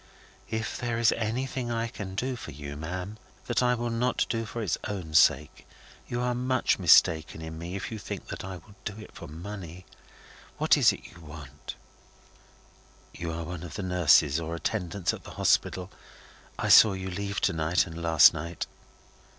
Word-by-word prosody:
"If 110 0 -3
there 120 -2 -2
is 115 -1 +4
anything 120 +2 -2
I 115 0 -1
can 100 -4 -7
do 130 +5 -1
for 115 - -9
you, 75 0 -7
ma'am, 90 +7 -5 0.3
that 120 - +1
I 125 0 +3
will 120 0 -3
not 120 +2 +1
do 115 -1 -1
for 115 +2 -5
its 100 - 0
own 95 -7 -5
sake, 75 -1 +3 0.4
you 120 - -3
are 125 0 0
much 125 -1 +1
mistaken 80 -2 +5
in 80 0 -7
me 85 +3 -6
if 100 - -5
you 110 - -5
think - - -7
that - - -6
I 95 0 -6
will 90 +4 -14
do 105 0 -5
it 105 - -11
for 85 - -9
money. 90 +2 -8 0.7
What - - +4
is - - +5
it - - -9
you 85 - -15
want?" 75 -3 -10 1.4
"You 85 -1 -5
are 85 +1 -4
one 85 0 -6
of 85 -2 -8
the 100 - -4
nurses 80 -4 +4
or 85 0 -4
attendants 90 -1 -2
at - - -8
the - - -11
Hospital; 90 0 +1 0.7
I - - -2
saw 110 - +8
you 95 0 -5
leave 100 +1 -3
to - - +2
night 80 +2 +1
and 80 0 -8
last 80 -3 +7
night." 85 +3 -4
95 Hz, 185 wpm, -28 LUFS, 80-110 Hz, 1.4 s, saw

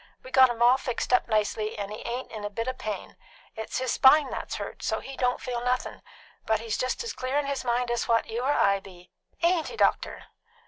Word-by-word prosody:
We 255 - -11
got 260 -1 +7
him 235 0 0
all 250 +2 +6
fixed 250 0 -2
up 250 - +4
nicely, 215 -1 0
and 200 0 -4
he 215 - -6
ain't 245 +2 -5
in 215 -2 -7
a 205 - -2
bit 230 +3 -4
o' 255 - 0
pain. 215 -5 -6 0.4
It's 220 -1 -4
his 255 -1 -1
spine 275 +1 +6
that's - - -4
hurt, - - -6
so't - - -2
he 270 - -8
don't 250 -1 0
feel 250 -2 -4
nothin'; 250 +1 -1 0.5
but 220 -1 +2
he's 225 -1 -3
just 255 - -1
as 460 - -4
clear 255 +2 -2
in 290 - +1
his 280 -1 -2
mind 240 0 0
as 240 - -1
what 230 -1 +3
you 230 +2 -4
or 265 +3 +1
I 200 -8 +3
be. 180 -2 -15 0.3
Ain't 340 -1 +3
he, 465 - -8
doctor?" - - +1
245 Hz, 235 wpm, -27 LUFS, 220-260 Hz, 0.5 s, got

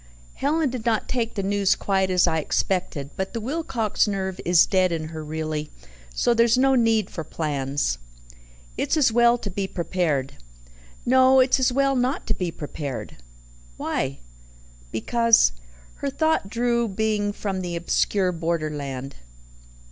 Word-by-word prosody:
"Helen 295 0 0
did 250 -3 -5
not 225 -2 0
take 235 -2 -2
the 200 - -2
news 200 0 +2
quite 190 -1 0
as 180 -1 +4
I 160 -2 +1
expected, 155 -3 -1
but 190 0 -4
the - - -1
Wilcox 235 -5 -1
nerve 190 -2 -3
is 175 -1 +5
dead 185 -2 +2
in 160 -2 -3
her 160 -1 -7
really, 155 0 -4 0.4
so 150 - +2
there's 235 +1 +4
no 270 +1 +4
need 225 -5 +2
for 160 - -5
plans." 140 - -2 0.8
"It's - - +1
as 270 -6 +4
well 235 +1 +4
to 215 - -6
be 195 +1 -2
prepared." 170 -7 -2 0.7
"No 260 +1 +5
it's 260 +1 +4
as 255 -1 +3
well 275 +1 +2
not 255 +2 0
to - - 0
be 180 -2 -2
prepared." 145 -4 -6 1.7
"Because 230 - +4 0.2
' - - -24
Her 280 - -1
thought 315 -7 0
drew 235 +1 +1
being 210 0 0
from 195 -2 -4
the 175 -1 -4
obscure 180 +2 +1
borderland. 150 -5 -3
195 Hz, 150 wpm, -24 LUFS, 160-235 Hz, 1.7 s, is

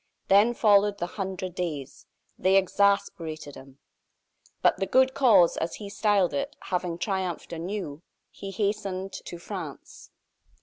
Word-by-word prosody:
Then 210 +5 +5
followed 205 -2 +4
the 175 - -2
"Hundred 185 0 -5
Days." 155 -7 -5 0.3
They 190 +1 +2
exasperated 185 -6 +1
him. 135 0 -13 0.9
But - - +4
"the 195 - -2
good 260 +3 +4
cause," 220 -10 +5
as 165 - -2
he 200 -2 -8
styled 205 -4 +2
it, 280 +1 -3 0.2
having 180 -2 -1
triumphed 185 -2 -3
anew, 165 -3 -5 0.3
he 195 - -8
hastened 195 -1 -2
to 175 - -7
France. 170 -5 -8
190 Hz, 130 wpm, -27 LUFS, 170-205 Hz, 0.9 s, Then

